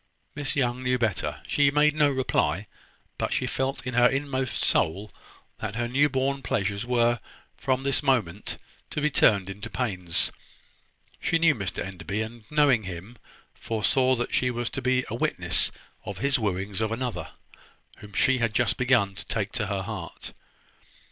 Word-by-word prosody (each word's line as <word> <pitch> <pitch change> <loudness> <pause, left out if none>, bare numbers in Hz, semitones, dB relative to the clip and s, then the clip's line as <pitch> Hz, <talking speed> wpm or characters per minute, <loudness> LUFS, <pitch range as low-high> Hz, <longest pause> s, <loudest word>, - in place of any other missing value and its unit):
Miss 145 -1 -1
Young 125 -2 0
knew 125 0 +1
better. 110 -7 -1
She 145 -1 +4
made 150 +1 +4
no 150 -1 +4
reply; 105 - 0 0.5
but - - -1
she - - 0
felt 135 0 -2
in 130 - -3
her 120 +1 +6
inmost 135 -1 -1
soul 95 +5 +1 0.5
that 110 -1 -4
her 120 +1 -1
new 140 +4 +3
born 135 0 0
pleasures 100 0 -1
were, 120 -1 +2 0.4
from 130 0 -1
this 140 0 +2
moment, 110 - 0 0.3
to - - -3
be 150 +1 +1
turned 100 -7 +4
into 100 +1 -6
pains. 95 -9 0 0.9
She 165 - +2
knew 165 -1 +5
Mr 100 - -3
Enderby; 95 +2 -5
and 110 -1 -10
knowing 145 -6 +4
him, 95 +6 -8 0.3
foresaw 130 +4 +1
that 120 0 -3
she 125 - +2
was 120 -1 -2
to 135 - -4
be 130 0 +1
a - - -6
witness - - +2 0.3
of 100 - -6
his 140 +3 +2
wooings 100 -1 -1
of 110 0 0
another, 120 +1 -3 0.6
whom 105 -1 -13
she 130 +5 +3
had 115 -2 0
just 125 -2 +2
begun 120 -6 +3
to 90 - -6
take 105 -2 -2
to 110 -5 -1
her 100 -1 -2
heart. 95 -4 -6
120 Hz, 170 wpm, -26 LUFS, 100-130 Hz, 0.9 s, her